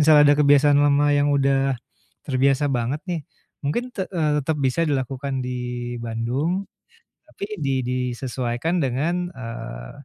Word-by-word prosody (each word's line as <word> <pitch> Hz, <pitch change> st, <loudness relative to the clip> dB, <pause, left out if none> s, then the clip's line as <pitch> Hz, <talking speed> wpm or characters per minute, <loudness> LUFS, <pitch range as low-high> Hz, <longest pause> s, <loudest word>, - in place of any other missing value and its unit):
misalnya 150 Hz, 0 st, +7 dB
ada 145 Hz, -, +6 dB
kebiasaan 145 Hz, 0 st, +5 dB
lama 145 Hz, 0 st, +4 dB
yang 145 Hz, 0 st, +3 dB
udah 135 Hz, -1 st, +2 dB, 0.5 s
terbiasa 135 Hz, +1 st, +2 dB
banget 120 Hz, +5 st, -1 dB
nih. 175 Hz, -2 st, -1 dB, 0.4 s
Mungkin 150 Hz, +13 st, -1 dB
te 190 Hz, -, -2 dB
eee, 160 Hz, -5 st, +1 dB
tetap 150 Hz, +2 st, -1 dB
bisa 130 Hz, +6 st, 0 dB
dilakukan 135 Hz, 0 st, -2 dB
di 125 Hz, -, -3 dB, 0.5 s
Bandung 125 Hz, -, -1 dB, 0.6 s
tapi -, -, -6 dB, 0.2 s
di 135 Hz, -, +1 dB
disesuaikan 125 Hz, +3 st, -2 dB
dengan, 160 Hz, +8 st, 0 dB
eee, 115 Hz, -, -7 dB
140 Hz, 130 wpm, -23 LUFS, 125-150 Hz, 0.6 s, misalnya